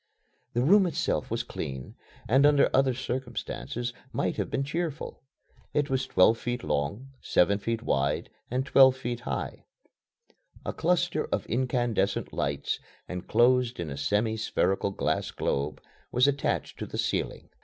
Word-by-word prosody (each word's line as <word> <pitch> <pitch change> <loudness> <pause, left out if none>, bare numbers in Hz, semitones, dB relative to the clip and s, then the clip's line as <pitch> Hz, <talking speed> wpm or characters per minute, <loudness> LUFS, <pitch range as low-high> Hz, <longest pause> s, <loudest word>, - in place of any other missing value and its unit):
The 120 - +1
room 190 +6 +6
itself 165 - -1
was - - -1
clean, 65 -1 -6 0.3
and 135 +4 +4
under 145 -1 +5
other 130 -1 +3
circumstances 120 0 -4 0.2
might - - -1
have - - -1
been 135 - 0
cheerful. 160 +1 -4 0.5
It 145 -2 +1
was 130 0 0
twelve 110 +5 +4
feet 120 0 -3
long, 100 - -2
seven 100 +3 +3
feet 115 +2 -2
wide, 70 - 0 0.2
and 130 +2 -1
twelve 130 -1 +6
high. 120 0 -4 1.0
A - - -2
cluster 175 -2 +1
of - - -2
incandescent 120 -4 0
lights, 70 0 -1 0.3
enclosed 120 +6 +2
in 80 -4 -3
a - - -4
semi 105 +9 +1
spherical 100 -2 +1
glass 100 - -1
globe, 70 +2 -2 0.3
was 125 +3 +4
attached 140 0 -1
to - - -4
the - - -6
ceiling. - - -2
120 Hz, 140 wpm, -28 LUFS, 100-135 Hz, 1.0 s, room